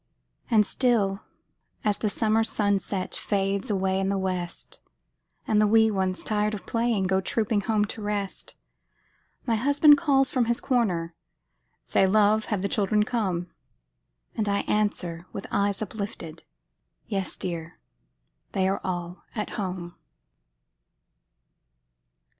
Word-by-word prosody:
And 215 -3 +5
still, 210 -5 +1 0.6
as 210 -1 +1
the 215 - 0
summer 220 +1 +2
sunset 200 -3 -1
Fades 195 0 -1
away 190 -1 +1
in 195 0 0
the 200 - 0
west, 185 -2 -4 0.7
And 215 -1 +3
the 210 - +4
wee 220 +1 +5
ones, 190 -2 -1
tired 210 0 0
of 200 - -9
playing, 230 -4 0
Go 190 +1 +2
trooping 210 +2 0
home 210 0 +1
to 215 - -7
rest, 205 -2 -3 0.9
My 235 - +1
husband 285 +5 +5
calls 270 -4 +4
from 250 -3 +2
his 235 +1 0
corner, 185 -11 0 0.7
"Say, 190 - +2
love, 215 +2 +3
have 200 -3 -2
the - - +1
children 210 +1 +2
come?" 190 -7 -2 0.8
And 215 -3 0
I 200 0 +1
answer, 180 -5 -1
with 195 - -5
eyes 200 +1 +1
uplifted, 200 -6 -7 0.6
"Yes, 195 -3 -2
dear! 170 -2 -4 0.8
they 190 -1 +2
are 195 - -1
all 175 -1 -4
at 210 -2 -3
home." 180 -4 -4
205 Hz, 130 wpm, -26 LUFS, 190-220 Hz, 0.9 s, And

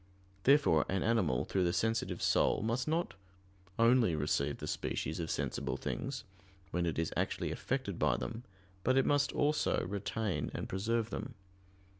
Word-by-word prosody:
Therefore 135 - +5
an 95 0 0
animal 100 - +2
through 95 - 0
the 85 -1 +1
sensitive 115 +5 0
soul - - +3
must 115 +3 -1
not 165 +3 0 0.6
only 115 -6 +4
receive 70 -1 0
the - - -6
species 80 +2 -2
of 80 -1 -3
sensible - - -2
things, 135 -2 -4 0.5
when 85 0 0
it 80 - -2
is 80 -1 -1
actually - - -1
affected 125 -9 -3
by 70 -5 +2
them, 115 0 -5 0.4
but 130 +2 +3
it 135 - +4
must 145 0 +2
also 150 +1 +1
retain 100 +1 -2
and - - -3
preserve 115 +4 -1
them. 125 - -5
110 Hz, 155 wpm, -33 LUFS, 85-130 Hz, 0.6 s, Therefore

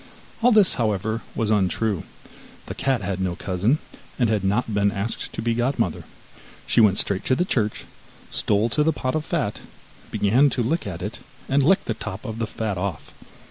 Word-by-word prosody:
All 245 +2 +5
this, 210 -5 +5
however, 110 +1 0
was 110 -2 0
untrue; 100 -1 +1 0.6
the - - -5
cat 130 -6 0
had 95 0 -2
no 90 -2 -1
cousin, 100 - +1 0.4
and 120 -4 +2
had 105 -3 +1
not 105 +3 0
been 100 0 +2
asked 105 +2 -3
to - - -4
be 115 0 +1
godmother. 120 - -1 0.6
She - - +4
went 100 -3 +5
straight 100 -2 +1
to 130 - +3
the 180 - +1
church, 110 - -1 0.5
stole 105 +2 +2
to 150 - +2
the 160 +2 +3
pot 130 -2 -2
of 155 - -1
fat, - - -2 0.5
began 125 +8 +3
to 125 - -1
lick 150 +2 -1
at 90 -2 -5
it, 105 +3 -5 0.3
and 140 +1 +3
licked 185 +8 +3
the 115 - -1
top 110 0 -7
of 110 -1 -5
the 115 - -1
fat 105 -4 -3
off. 90 -6 -4
110 Hz, 190 wpm, -23 LUFS, 100-130 Hz, 0.6 s, All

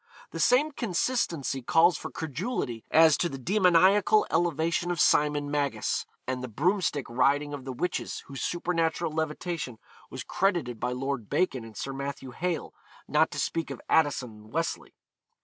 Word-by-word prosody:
The - - -6
same 290 +5 +4
consistency 180 - -1
calls 165 +7 +4
for - - -6
credulity 155 - -4
as 160 -1 +6
to 175 - 0
the 135 - -6
demoniacal 190 - +4
elevation 170 +1 +1
of 175 -2 -2
Simon 150 -1 +3
Magus, 145 -1 -1 0.2
and 130 0 -3
the - - -3
broomstick 150 - 0
riding 140 +4 +1
of 140 -2 -7
the 135 - -4
witches 175 +8 -3
whose 135 -2 -7
supernatural 170 -1 -1
levitation 155 -3 -3 0.3
was - - -6
credited 175 - 0
by 125 - -1
Lord 125 -3 -3
Bacon 135 -10 0
and 110 -2 -11
Sir 135 - -4
Matthew 140 -1 -5
Hale, 175 +5 -3 0.3
not 155 +2 +3
to - - -5
speak 165 -1 -1
of - - -6
Addison 145 -6 +2
and 105 0 -15
Wesley. 165 +3 -3
155 Hz, 155 wpm, -28 LUFS, 135-175 Hz, 0.3 s, as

